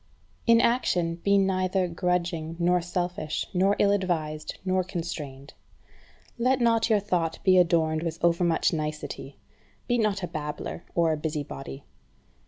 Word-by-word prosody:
5. 230 - +7
In 230 - +5
action 180 -9 +1
be 200 +3 +2
neither 185 -1 +1
grudging, 170 -2 -1
nor 175 +1 +2
selfish, 175 -3 -3
nor 195 +2 +3
ill 200 - +4
advised, 160 -6 -2
nor 185 0 +1
constrained. 155 -7 -6 0.9
Let 255 +2 +2
not 230 -1 +3
your 215 -2 +4
thought 175 -5 -1
be 185 -1 +6
adorned 160 -2 +2
with 165 -1 -3
overmuch 170 -1 +2
nicety. 155 -1 -5 0.5
Be 245 -1 +1
not 205 -3 0
a - - -1
babbler 155 0 -5
or 165 -2 +3
a - - -2
busybody. 145 -3 -5
175 Hz, 140 wpm, -27 LUFS, 160-190 Hz, 0.9 s, 5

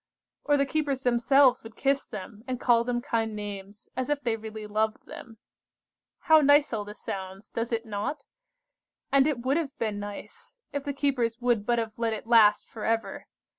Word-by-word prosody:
Or 290 -1 +3
the 280 - +2
keepers 280 -2 -1
themselves 250 +2 +4
would 225 -1 -12
kiss 275 +2 0
them, 210 +2 -9
and 255 -1 -3
call 235 -2 +4
them 240 0 -1
kind 225 -5 -1
names, 205 -1 -8
as 260 +2 -2
if 295 -1 +1
they 235 -5 -1
really 220 -1 -8
loved 215 +1 -1
them. 225 -2 -11 0.8
How 315 -1 +6
nice 285 -1 +4
all 215 -2 -1
this 205 +1 -11
sounds, 190 +1 -7
does 230 +1 -3
it 230 0 -1
not? 220 +7 -4 0.9
And 275 0 +5
it 265 -6 -1
would 270 +4 +2
have 300 -5 -3
been 215 -3 -2
nice, 205 - -9 0.2
if 285 -1 -2
the 285 - -2
keepers 255 -5 0
would 240 -4 +1
but 240 -1 +2
have 225 -1 -3
let 230 -1 0
it 220 - -6
last 220 -3 +5
for 220 - -9
ever. 225 0 -2
235 Hz, 190 wpm, -27 LUFS, 215-275 Hz, 0.9 s, How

